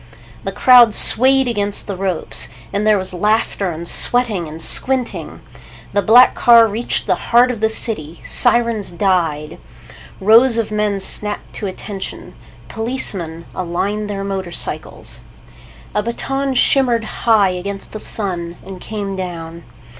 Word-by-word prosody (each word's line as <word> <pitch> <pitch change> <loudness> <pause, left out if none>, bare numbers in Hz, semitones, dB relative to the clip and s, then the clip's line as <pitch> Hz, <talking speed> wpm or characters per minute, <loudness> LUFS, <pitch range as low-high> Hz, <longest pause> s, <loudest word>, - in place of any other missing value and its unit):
The - - -4
crowd 245 -4 +5
swayed 265 +2 +6
against 205 -3 -2
the 200 - -5
ropes, 185 -3 -3 0.2
and 205 +2 -1
there 215 -1 +4
was 190 0 -6
laughter 205 0 -1
and 170 0 -6
sweating 220 -8 +3
and 155 +1 -10
squinting. 255 +8 -1 0.5
The 205 - +1
black 235 +6 +5
car 235 -1 +5
reached 225 +3 -3
the - - +1 0.2
heart 245 +2 +4
of 235 - -7
the 220 0 +1
city. 170 -8 -1
Sirens 235 -5 +3
died. 170 -5 -2 0.6
Rows 230 +4 +4
of 225 -2 -2
men 210 -1 -1
snapped 210 +2 -2
to 205 - -5
attention. 195 +1 -8 0.3
Policemen 195 -9 -4
aligned 195 +4 -3
their 195 -1 -4
motorcycles. 190 -3 -4 0.7
A 210 - 0
baton 270 +4 -3
shimmered 245 -3 +2
high 215 -2 +1
against 195 +2 -6
the 215 - -7
sun 175 -6 -3
and 190 -1 -10
came 200 -2 -5
down. 170 -2 -7
205 Hz, 135 wpm, -17 LUFS, 185-230 Hz, 0.7 s, swayed